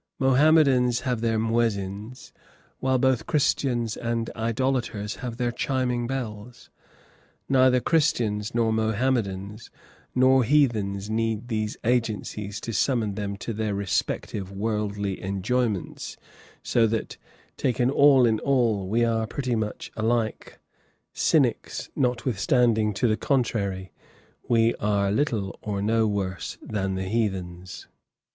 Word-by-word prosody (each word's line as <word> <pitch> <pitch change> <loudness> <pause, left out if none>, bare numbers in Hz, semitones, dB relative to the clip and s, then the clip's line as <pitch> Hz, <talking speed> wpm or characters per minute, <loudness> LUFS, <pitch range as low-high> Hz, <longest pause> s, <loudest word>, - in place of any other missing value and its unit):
Mohammedans 135 -3 +4
have 125 -4 -2
their 115 -1 +1
muezzins, 110 0 -2 0.5
while 130 0 +1
both 130 -2 +1
Christians 125 -6 +1
and 115 -1 -2
idolaters 115 -2 -1
have 120 -3 -6
their 120 -1 0
chiming 125 -1 -1
bells. 120 -3 -6 0.8
Neither 130 -1 +4
Christians, 115 -9 0
nor 115 -2 +2
Mohammedans, 110 -3 -1 0.5
nor 130 0 +5
heathens 110 -7 +1
need 115 +1 -2
these 110 -1 -2
agencies 110 -3 -1
to 115 - -5
summon 115 -4 +1
them 100 0 -4
to 115 - -5
their 105 -1 -2
respective 100 0 -2
worldly 105 -1 -2
enjoyments, 100 +2 -2 0.5
so 115 -1 +3
that, 110 0 -3 0.4
taken 125 0 +1
all 140 -3 +6
in 110 -2 +2
all, 115 -8 +1
we 115 +3 +2
are 115 -1 0
pretty 130 -1 -2
much 110 -1 -4
alike 110 0 -1 0.6
cynics, - - 0
notwithstanding, 120 -2 +1
to 120 - +1
the 110 -1 +1
contrary, 100 - -1 0.6
we 115 0 +4
are 100 -1 +1
little 110 -5 -1
or 105 -2 -3
no 110 +2 +2
worse 95 -4 -3
than 95 -2 -2
the 95 - -2
heathens. 95 -4 -3
115 Hz, 115 wpm, -25 LUFS, 105-125 Hz, 0.8 s, all